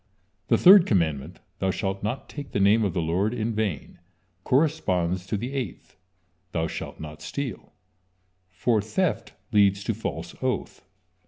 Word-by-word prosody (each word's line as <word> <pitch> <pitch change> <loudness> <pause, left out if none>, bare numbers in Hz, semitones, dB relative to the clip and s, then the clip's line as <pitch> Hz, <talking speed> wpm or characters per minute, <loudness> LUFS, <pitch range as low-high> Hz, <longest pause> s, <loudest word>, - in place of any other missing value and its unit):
The - - +4
third 185 0 +8
commandment: 80 - 0 0.2
"Thou 95 - 0
shalt 95 0 -2
not 110 +6 -3
take 145 -2 -8
the - - +1
name 105 +3 +4
of 95 -5 -1
the 85 - 0
Lord 95 +8 0
in 115 0 -1
vain," 105 -6 -3 0.4
corresponds 95 - +1
to 105 - -1
the 120 +6 -5
eighth: 130 -10 -5 0.6
"Thou 80 -1 0
shalt - - -6
not 75 -1 -8
steal," 130 - -5 0.8
for 105 +4 +1
theft 160 - -1 0.2
leads 100 -2 +4
to 115 - -1
false 110 - -5
oath. - - -2
100 Hz, 150 wpm, -26 LUFS, 90-120 Hz, 0.8 s, third